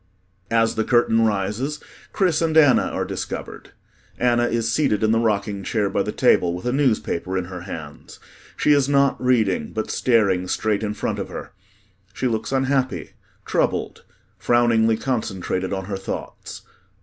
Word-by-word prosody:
As 115 0 +2
the 110 - 0
curtain 115 -1 +3
rises, 105 +8 -2 0.3
CHRIS 180 -6 +1
and 160 -1 +1
ANNA 145 -5 +6
are - - -3
discovered. - - -6 0.5
ANNA 120 -1 +2
is 115 -1 0
seated 110 -8 +1
in 110 - +3
the 115 - +3
rocking 105 -3 -1
chair 100 0 -1
by - - +1
the - - -2
table, 85 -1 +2
with 90 - -8
a 125 - +1
newspaper 110 -9 0
in 90 - -2
her 90 0 -8
hands. 80 -5 -9 0.4
She 150 - +2
is 140 -2 +3
not 140 -2 +2
reading 110 -11 +1
but 110 0 -3
staring 100 -7 +2
straight 105 +2 0
in 105 -1 -3
front - - -3
of - - -5
her. - - -8 0.6
She - - -3
looks 110 -2 -1
unhappy, 135 -1 0 0.3
troubled, - - -1 0.4
frowningly 115 -2 +3
concentrated 95 -7 -2
on 95 -1 -3
her 100 0 -4
thoughts. 95 - -7
115 Hz, 160 wpm, -22 LUFS, 100-130 Hz, 0.6 s, ANNA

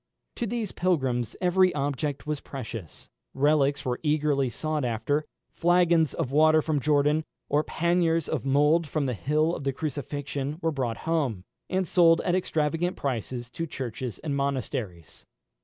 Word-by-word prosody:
To 240 - -1
these 225 -2 -3
pilgrims 130 -10 0
every 185 0 +4
object 145 0 -2
was 150 -1 -2
precious. 115 - -8 0.3
Relics 145 0 +2
were 125 -1 -1
eagerly 150 -3 +1
sought 155 +5 -2
after; 125 +6 0 0.3
flagons 175 -2 +3
of 130 - -2
water 155 +2 +5
from 155 -2 0
Jordan, 150 +2 +2 0.3
or 150 +1 +2
panniers 170 -1 +1
of - - -2
mould 150 +4 +3
from 145 0 -1
the 125 - -1
hill 155 - +1
of - - -6
the 135 - +1
Crucifixion, 145 0 -4
were 165 -2 0
brought 125 -6 -2
home, 140 - 0 0.3
and 190 0 0
sold 165 -1 +5
at 175 - 0
extravagant 165 0 0
prices 120 -2 -3
to 165 +4 -4
churches 125 -4 -5
and 145 -2 -3
monasteries. 130 - -4
150 Hz, 150 wpm, -27 LUFS, 135-165 Hz, 0.3 s, water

